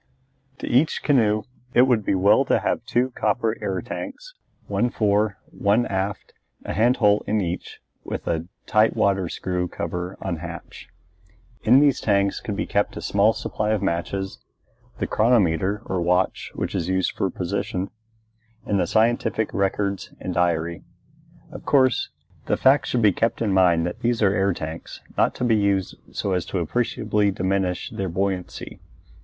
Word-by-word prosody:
To - - -6
each 140 +6 +2
canoe 110 -7 +3 0.3
it 120 - +7
would 125 -5 +2
be 100 - +1
well 100 +7 +4
to - - +3
have - - -1
two 125 +2 +1
copper 115 -2 0
air - - -1
tanks, - - -7 0.3
one 120 - 0
fore, 105 -2 +1
one 105 +4 +2
aft, 95 0 -3 0.3
a - - -3
hand 120 +4 +3
hole 105 -2 +3
in 105 +1 +1
each 90 -2 -4 0.2
with - - -5
a 80 +1 -1 0.5
water 100 -1 +2
tight 85 - -6
screw 90 -1 -2
cover 90 +2 -5
on 95 -3 -3
hatch. 85 0 -9 0.7
In 125 +5 +6
these 145 -3 +3
tanks 100 -2 +1
could 105 - -4
be - - -2
kept 100 0 -1
a - - -5
small 100 +2 +3
supply 105 -1 -2
of 105 -2 -1
matches, 95 +2 -2 0.6
the - - -1
chronometer 105 -3 +2
or 95 -1 -2
watch 90 +2 0
which - - -3
is 85 - -1
used 95 0 +1
for 95 - -1
position, 95 +1 -3 0.7
and 100 -2 +1
the 90 - +1
scientific 110 0 +1
records 100 0 -1
and - - -4
diary. 85 -1 0 0.7
Of - - -9
course, 130 -3 +3 0.4
the - - +1
fact 135 +2 +4
should 120 -2 0
be 105 - +6
kept 115 +5 0
in 105 -4 0
mind 85 -3 +4
that 90 - -4
these 120 -1 0
are 100 -1 +4
air 100 0 +2
tanks, 80 0 -7 0.2
not - - +2
to - - -4
be 115 -3 +3
used 100 -2 +1 0.2
so 100 - -2
as 90 -2 0
to - - -3
appreciably 105 +2 0
diminish 95 -1 -1
their 95 -1 -3
buoyancy. 95 +1 -3
100 Hz, 165 wpm, -23 LUFS, 90-110 Hz, 0.7 s, it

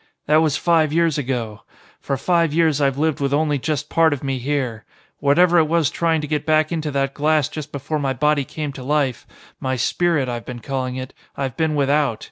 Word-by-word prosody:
"That 155 +1 +4
was 155 -2 +1
five 165 -3 +2
years 165 -2 +2
ago. 120 -6 -3 0.4
For 140 - -2
five 165 +1 +1
years 160 -3 +2
I've 135 -1 +1
lived 155 -1 0
with 140 0 0
only 150 -1 +1
just 150 +1 -2
part 165 -1 +3
of 145 - -6
me 135 -1 -2
here. 125 -4 -2 0.4
Whatever 175 +5 +4
it 155 - +3
was 160 -2 +1
trying 165 -2 +1
to 150 - -5
get 150 0 -1
back 155 0 +2
into 160 -2 -2
that 135 -1 -1
glass 150 -1 +2
just 155 -1 -7
before 145 +2 -3
my 135 -2 -1
body 150 0 +1
came 150 +1 -5
to 130 - -9
life 140 -3 -1 0.3
my 130 0 -1
spirit, 150 +3 +1
I've 120 -1 -4
been 125 - -7
calling 130 0 -3
it 130 +1 -6 0.2
I've 135 -3 -3
been 160 -1 0
without. 140 -4 +1
145 Hz, 210 wpm, -21 LUFS, 135-155 Hz, 0.4 s, That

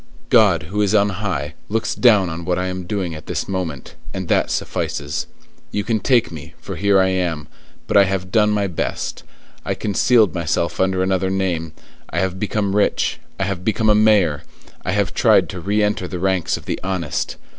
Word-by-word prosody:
God, 105 -9 +5
who 105 - +1
is 105 +1 +2
on 100 -1 +4
high, 90 -7 -3 0.2
looks 110 +1 -1
down 105 -7 +4
on 85 0 -5
what 90 +1 0
I 90 - -1
am 90 -1 -5
doing 95 -4 -2
at 75 - -10
this - - -3
moment, 90 -7 -4 0.2
and 95 -3 -4
that - - +2
suffices. - - -3 0.4
You 105 - -2
can 115 0 0
take 120 0 +2
me, 80 +1 -10
for 100 -3 -7
here 100 +3 +3
I 95 0 +3
am: 85 -5 -1 0.4
but - - -3
I 100 -1 +7
have 95 -1 -3
done 105 -1 +4
my 105 -1 +1
best; 90 -4 -3 0.4
I - - -2
concealed 110 0 +3
myself 85 -1 -1
under 95 0 +2
another 95 0 0
name; 90 -4 -1 0.4
I 80 - -5
have 95 0 -1
become 100 -1 -1
rich; 105 - +1 0.2
I - - +1
have 95 -2 -3
become 110 +2 +2
a - - +6
mayor; 105 -8 +3 0.4
I 95 - -1
have 100 -3 0
tried - - +4
to 90 - -6
re 105 +4 +1
enter 105 -3 0
the 90 - -5
ranks 95 -1 0
of - - -13
the - - -3
honest. 90 -5 -2
95 Hz, 200 wpm, -20 LUFS, 90-105 Hz, 0.4 s, I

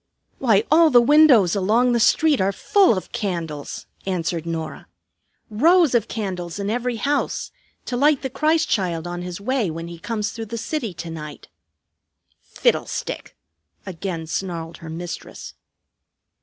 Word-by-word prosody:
"Why, 220 -5 +3
all 325 +1 +6
the 250 -4 +7
windows 245 - +5
along 220 +6 +2
the 240 - +2
street 300 +3 +3
are 190 +1 +2
full 370 - +3
of 185 - -6
candles," 165 -7 -4 0.2
answered 170 -3 -2
Norah; 160 -2 -5 0.6
"rows 320 - +4
of 230 -2 +2
candles 185 -5 -4
in 200 0 -2
every 245 +1 -1
house, 285 +6 -1 0.3
to 250 - -3
light 285 +2 +3
the 265 - -2
Christ 315 +4 +1
Child 175 -5 -1
on 175 0 -5
his 180 0 -6
way 230 -1 0
when 165 +1 -6
he 170 -1 -9
comes 210 +2 -3
through 225 -1 -6
the 230 - -5
city 240 -2 -3
to 165 0 -7
night." 150 -2 -9 0.9
"Fiddlestick!" - - -2 0.5
again 180 -3 -5
snarled 165 -1 -4
her 165 - -10
mistress. 165 +1 -7
200 Hz, 145 wpm, -22 LUFS, 170-250 Hz, 0.9 s, the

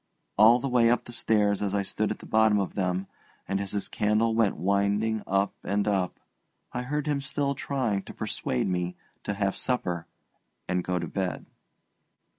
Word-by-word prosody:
All 110 +3 +7
the 135 - -3
way 120 -3 +4
up 120 - +2
the - - -11
old - - -6
stairs 105 -2 +2
as 100 -1 0
I 100 - +1
stood 105 +2 -1
at 105 - -3
the - - -12
bottom 110 -1 +4
of 100 - -2
them, 95 -1 -1 0.4
and 100 +1 0
as 100 - -4
his 100 - -1
candle 105 +2 +1
went 110 -3 +2
winding 100 +5 +1
up 100 +1 +1
and 100 +1 0
up, 95 -3 0 0.5
I 125 - -2
heard 145 +4 -2
him 145 -2 0
still 140 0 -1
trying 130 -8 -1
to - - -9
persuade 65 - -2
me 90 -1 -1 0.3
to 105 - -2
have 100 -1 0
supper 90 -10 -1 0.6
and 90 -1 0
go 90 0 -1
to - - -2
bed. 95 -2 -3
105 Hz, 190 wpm, -27 LUFS, 95-115 Hz, 0.6 s, All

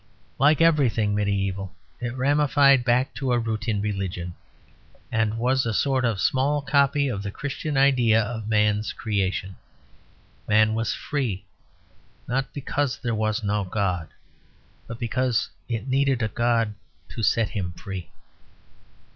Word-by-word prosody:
Like 150 +3 +4
everything 130 -10 +3
mediæval, 100 -1 -1 0.3
it 120 0 -4
ramified 140 -1 +4
back 125 +2 +2
to 125 +1 -1
a - - +3
root 110 -1 -2
in 105 -3 0
religion; 95 -4 -3 0.8
and 110 -1 0
was 130 +3 +2
a 115 -2 -1
sort 135 0 +1
of 110 -4 0
small 140 +5 +1
copy 140 0 +2
of 105 -7 -3
the 100 - -4
Christian 145 +5 -4
idea 125 -5 +4
of 110 -1 -3
man's 105 0 +1
creation. 95 -2 -2 0.9
Man 110 0 +4
was 115 0 -1
free, 115 -10 -3 0.8
not 135 +2 -1
because 145 -1 -2
there 120 -3 -2
was 110 +1 -1
no 105 0 0
God, 90 -3 -1 0.8
but 115 - -7
because 125 0 0 0.2
it 115 0 -3
needed 135 -2 +1
a 110 - 0
God 115 -1 +1 0.4
to 115 - -6
set 110 +1 +2
him 95 -5 -3
free. 95 -1 -7
115 Hz, 140 wpm, -24 LUFS, 105-135 Hz, 0.9 s, Like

